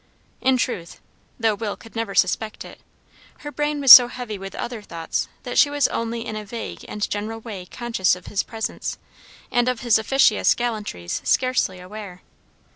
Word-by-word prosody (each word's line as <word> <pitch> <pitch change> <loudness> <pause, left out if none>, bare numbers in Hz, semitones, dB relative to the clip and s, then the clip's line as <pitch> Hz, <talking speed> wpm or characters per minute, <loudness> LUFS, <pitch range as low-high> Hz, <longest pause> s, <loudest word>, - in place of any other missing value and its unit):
In 260 0 +3
truth, 185 -10 -3 0.4
though 225 -2 +2
Will 205 -1 -4
could 225 - -16
never 225 -3 -3
suspect 215 +4 0
it, - - -13 0.6
her 295 - -7
brain 295 0 -1
was 275 -3 +6
so 245 -2 +12
heavy 245 -3 -6
with 195 -1 -8
other 235 -2 -5
thoughts 165 -5 -4 0.2
that - - 0
she 290 - +6
was 290 -1 +2
only 230 0 -3
in 215 - -5
a 215 - -5
vague 225 +3 -7
and 210 0 -3
general 215 +2 -4
way 205 -6 -8
conscious 230 -7 0
of 180 - -14
his 200 - -1
presence; 225 -2 -5 0.5
and 245 +1 +2
of 250 -2 -3
his 235 -4 +3
officious 230 -1 +3
gallantries 210 - -4
scarcely 255 -8 +1
aware. 185 -1 -10
225 Hz, 175 wpm, -22 LUFS, 200-245 Hz, 0.6 s, so